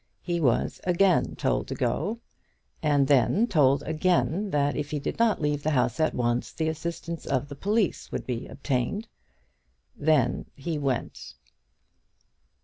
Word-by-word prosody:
He 175 Hz, -1 st, -1 dB
was 125 Hz, -6 st, +1 dB
again 180 Hz, +1 st, +2 dB
told -, -, 0 dB
to -, -, -4 dB
go; 205 Hz, +9 st, -1 dB, 0.6 s
and 145 Hz, -3 st, +3 dB
then 145 Hz, -, +4 dB
told 140 Hz, -, +3 dB
again, 175 Hz, +4 st, +1 dB
that 145 Hz, -3 st, +1 dB
if 145 Hz, -, -3 dB
he 150 Hz, -, -2 dB
did 145 Hz, -, -4 dB
not 230 Hz, -2 st, +3 dB
leave 150 Hz, -1 st, 0 dB
the 155 Hz, -, 0 dB
house 130 Hz, -3 st, +1 dB
at 155 Hz, -, +1 dB
once, 120 Hz, 0 st, 0 dB
the 160 Hz, -1 st, -1 dB
assistance 170 Hz, +1 st, -5 dB
of 140 Hz, +1 st, 0 dB
the 145 Hz, -, -7 dB
police 205 Hz, +5 st, 0 dB
would -, -, -4 dB
be 125 Hz, -1 st, -4 dB
obtained. 140 Hz, -, -2 dB, 0.9 s
Then 145 Hz, -5 st, +1 dB
he 150 Hz, +2 st, -3 dB
went. 135 Hz, -4 st, -3 dB
150 Hz, 145 wpm, -27 LUFS, 140-170 Hz, 0.9 s, then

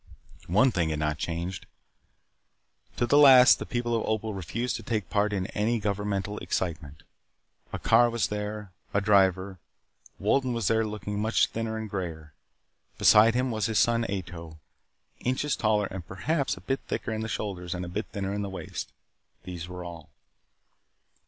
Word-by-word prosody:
One 110 Hz, +9 st, +4 dB
thing 85 Hz, -6 st, 0 dB
had 75 Hz, -, -1 dB
not 75 Hz, 0 st, -1 dB
changed. 85 Hz, +3 st, -4 dB, 1.3 s
To 120 Hz, -, +2 dB
the 145 Hz, +5 st, +4 dB
last 130 Hz, -3 st, +8 dB
the -, -, -6 dB
people 120 Hz, -1 st, -1 dB
of 115 Hz, -, 0 dB
Opal 110 Hz, 0 st, -1 dB
refused 100 Hz, +7 st, -3 dB
to -, -, -9 dB
take 110 Hz, -5 st, -3 dB
part 105 Hz, 0 st, +2 dB
in 95 Hz, -3 st, -1 dB
any 115 Hz, +3 st, +1 dB
governmental 105 Hz, 0 st, -2 dB
excitement. 80 Hz, -4 st, -4 dB, 0.7 s
A -, -, -3 dB
car 120 Hz, +1 st, +4 dB
was 115 Hz, -1 st, -1 dB
there. 105 Hz, -1 st, -5 dB, 0.2 s
A -, -, +5 dB
driver. 95 Hz, -2 st, +2 dB, 0.6 s
Wolden 125 Hz, +5 st, +1 dB
was 115 Hz, -4 st, 0 dB
there 110 Hz, -1 st, +2 dB
looking 105 Hz, -1 st, -4 dB
much 110 Hz, +2 st, +3 dB
thinner 115 Hz, 0 st, -3 dB
and 110 Hz, 0 st, -4 dB
grayer. 80 Hz, -6 st, -6 dB, 0.6 s
Beside 110 Hz, +2 st, +6 dB
him 125 Hz, 0 st, +1 dB
was 110 Hz, -3 st, 0 dB
his 110 Hz, -2 st, -1 dB
son, 115 Hz, +4 st, +3 dB
Ato, 85 Hz, -5 st, -6 dB, 0.6 s
inches 130 Hz, +4 st, 0 dB
taller 105 Hz, -2 st, +1 dB
and 95 Hz, -2 st, -6 dB
perhaps 135 Hz, -, -1 dB
a -, -, -11 dB
bit 135 Hz, 0 st, -2 dB
thicker 120 Hz, -, -3 dB
in 110 Hz, 0 st, -2 dB
the 110 Hz, -, -3 dB
shoulders 90 Hz, -4 st, -4 dB
and 90 Hz, 0 st, -4 dB
a -, -, -7 dB
bit 100 Hz, +5 st, -4 dB
thinner 100 Hz, -1 st, -4 dB
at 105 Hz, -, -2 dB
the 100 Hz, -, -3 dB
waist. 95 Hz, -, -6 dB, 0.5 s
These 85 Hz, -2 st, -7 dB
were 90 Hz, 0 st, -7 dB
all. 85 Hz, -3 st, -9 dB
105 Hz, 170 wpm, -27 LUFS, 90-115 Hz, 1.3 s, last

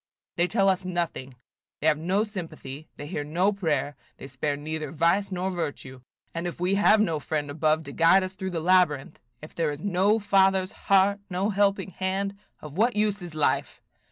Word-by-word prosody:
They 175 Hz, +1 st, +2 dB
tell 195 Hz, -1 st, +2 dB
us 190 Hz, 0 st, +2 dB
nothing; 170 Hz, -8 st, -3 dB, 0.4 s
they -, -, -5 dB
have 155 Hz, -1 st, +3 dB
no 185 Hz, +6 st, +1 dB
sympathy; 160 Hz, -8 st, -8 dB
they 145 Hz, -, -7 dB
hear 150 Hz, -1 st, -4 dB
no 175 Hz, +7 st, +1 dB
prayer; 150 Hz, -7 st, -1 dB, 0.2 s
they -, -, -10 dB
spare 140 Hz, +2 st, -3 dB
neither 155 Hz, 0 st, -5 dB
vice 170 Hz, +6 st, +1 dB
nor 185 Hz, +1 st, -2 dB
virtue. 145 Hz, -6 st, -5 dB, 0.3 s
And 170 Hz, +1 st, -3 dB
if 175 Hz, -, -6 dB
we 180 Hz, +2 st, +1 dB
have 205 Hz, +2 st, +5 dB
no 165 Hz, -8 st, +1 dB
friend 145 Hz, 0 st, -3 dB
above 155 Hz, +1 st, +1 dB
to 140 Hz, -, -8 dB
guide 165 Hz, +5 st, +5 dB
us 185 Hz, 0 st, -5 dB
through 190 Hz, 0 st, -5 dB
the 170 Hz, -3 st, -3 dB
labyrinth, 175 Hz, -6 st, +2 dB, 0.2 s
if 155 Hz, -, -10 dB
there 165 Hz, -2 st, 0 dB
is 145 Hz, -1 st, -5 dB
no 200 Hz, +3 st, +2 dB
Father's 195 Hz, -2 st, +2 dB
heart, 195 Hz, +1 st, +2 dB
no 190 Hz, +3 st, 0 dB
helping 200 Hz, -1 st, +1 dB
hand, 195 Hz, +2 st, -2 dB, 0.3 s
of 150 Hz, +4 st, -8 dB
what 235 Hz, +1 st, +3 dB
use 210 Hz, -1 st, 0 dB
is 175 Hz, -3 st, -8 dB
life? 155 Hz, -, 0 dB
180 Hz, 190 wpm, -26 LUFS, 155-195 Hz, 0.4 s, have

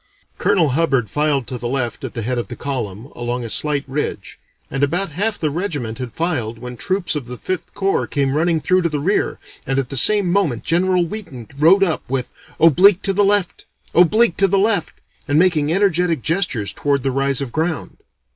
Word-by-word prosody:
Colonel 185 Hz, -7 st, +2 dB
Hubbard 135 Hz, -5 st, 0 dB
filed 145 Hz, -3 st, 0 dB
to 125 Hz, +2 st, -6 dB
the 120 Hz, -, -4 dB
left 120 Hz, -2 st, -2 dB
at -, -, -6 dB
the 115 Hz, -, -3 dB
head 125 Hz, +2 st, -1 dB
of 120 Hz, -, -4 dB
the -, -, -7 dB
column 120 Hz, -4 st, -5 dB
along 120 Hz, 0 st, -3 dB
a 115 Hz, -, -5 dB
slight 150 Hz, -2 st, 0 dB
ridge 140 Hz, +3 st, -4 dB, 0.3 s
and 135 Hz, -, -2 dB
about 170 Hz, +6 st, 0 dB
half 205 Hz, +7 st, -1 dB
the 155 Hz, -2 st, -1 dB
regiment 145 Hz, -, -4 dB
had 125 Hz, -2 st, -5 dB
filed 125 Hz, -9 st, -2 dB
when 125 Hz, +1 st, -8 dB
troops 190 Hz, +6 st, -1 dB
of 140 Hz, -5 st, -4 dB
the 125 Hz, 0 st, -7 dB
Fifth 185 Hz, +6 st, -5 dB
Corps 195 Hz, -1 st, 0 dB
came 140 Hz, -2 st, 0 dB
running 160 Hz, +1 st, +1 dB
through 185 Hz, +3 st, +2 dB
to 170 Hz, -, 0 dB
the 150 Hz, -, -2 dB
rear 190 Hz, +8 st, 0 dB, 0.3 s
and 135 Hz, -, 0 dB
at 135 Hz, -2 st, -1 dB
the 140 Hz, -, -5 dB
same 200 Hz, +6 st, +5 dB
moment 175 Hz, -, 0 dB
General 180 Hz, +1 st, +2 dB
Wheaton 165 Hz, -, -8 dB
rode 170 Hz, +7 st, +5 dB
up 170 Hz, -5 st, 0 dB
with 130 Hz, -1 st, -2 dB, 0.3 s
'oblique 180 Hz, +5 st, +5 dB
to 195 Hz, -, +1 dB
the 205 Hz, +2 st, +2 dB
left, 200 Hz, -2 st, 0 dB, 0.3 s
oblique 180 Hz, +3 st, +4 dB
to 195 Hz, -, +4 dB
the 195 Hz, +1 st, +1 dB
left,' 200 Hz, -3 st, +1 dB, 0.3 s
and 145 Hz, 0 st, +1 dB
making 160 Hz, -4 st, +3 dB
energetic 180 Hz, -, +1 dB
gestures 155 Hz, -, -1 dB
toward 140 Hz, -2 st, -1 dB
the 135 Hz, -, 0 dB
rise 135 Hz, 0 st, +1 dB
of 135 Hz, -4 st, -4 dB
ground. 160 Hz, +2 st, -3 dB
155 Hz, 205 wpm, -19 LUFS, 130-185 Hz, 0.3 s, same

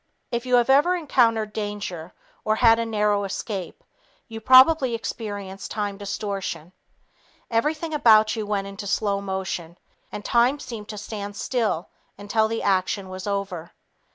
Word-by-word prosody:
If 235 Hz, +1 st, -3 dB
you 250 Hz, -, +4 dB
have 240 Hz, -1 st, +4 dB
ever 295 Hz, +7 st, +4 dB
encountered 230 Hz, -9 st, +1 dB
danger 205 Hz, -5 st, -5 dB, 0.3 s
or 215 Hz, -, +1 dB
had 225 Hz, 0 st, +5 dB
a 230 Hz, -, -1 dB
narrow 210 Hz, -2 st, +1 dB
escape, 195 Hz, -, -5 dB, 0.4 s
you 225 Hz, -2 st, -8 dB
probably 260 Hz, +1 st, +6 dB
experienced 205 Hz, -4 st, -6 dB
time 205 Hz, -2 st, -3 dB
distortion. 200 Hz, -4 st, -4 dB, 0.8 s
Everything 305 Hz, +7 st, 0 dB
about 220 Hz, -6 st, +5 dB
you 215 Hz, -2 st, -4 dB
went 200 Hz, -1 st, -1 dB
into 200 Hz, +1 st, -7 dB
slow 200 Hz, 0 st, 0 dB
motion, 190 Hz, -3 st, -4 dB, 0.3 s
and 210 Hz, -, -7 dB
time 245 Hz, +4 st, +3 dB
seemed 215 Hz, -5 st, -8 dB
to 210 Hz, -, -6 dB
stand 205 Hz, -1 st, -6 dB
still 220 Hz, -8 st, -1 dB, 0.3 s
until 210 Hz, +2 st, +1 dB
the 225 Hz, +1 st, -3 dB
action 190 Hz, 0 st, 0 dB
was 185 Hz, +1 st, -7 dB
over. 195 Hz, -4 st, -4 dB
210 Hz, 145 wpm, -24 LUFS, 200-230 Hz, 0.8 s, probably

